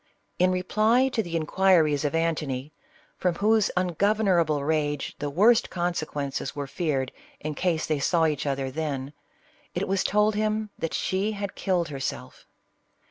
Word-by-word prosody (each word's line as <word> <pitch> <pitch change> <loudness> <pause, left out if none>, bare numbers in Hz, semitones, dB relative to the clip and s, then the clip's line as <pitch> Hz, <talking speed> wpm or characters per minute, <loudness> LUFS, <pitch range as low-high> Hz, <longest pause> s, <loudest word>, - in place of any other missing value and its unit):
In 185 +1 +4
reply 215 +8 +2
to 240 -3 0
the 170 -5 -5
in 160 -1 0
quiries 160 -5 +3
of 145 +2 -1
Antony, 155 -4 -1 0.5
from 180 -2 +1
whose 215 +2 +3
ungovernable 180 -4 +2
rage 145 -1 -1
the 145 - -2
worst 215 +10 +4
consequences 155 -6 -3
were 145 -1 -3
feared 135 -3 -2 0.3
in 155 0 -4
case 165 0 0
they 155 -2 0
saw 165 +3 +2
each 150 -2 -1
other 135 -1 -1
then, 140 -2 -3 0.6
it - - -1
was 195 0 +1
told 210 +1 +2
him 215 0 -1
that 165 - -2
she 195 +3 0
had 200 -2 -4
killed 180 -4 0
herself. 135 -2 -6
165 Hz, 150 wpm, -26 LUFS, 145-195 Hz, 0.6 s, In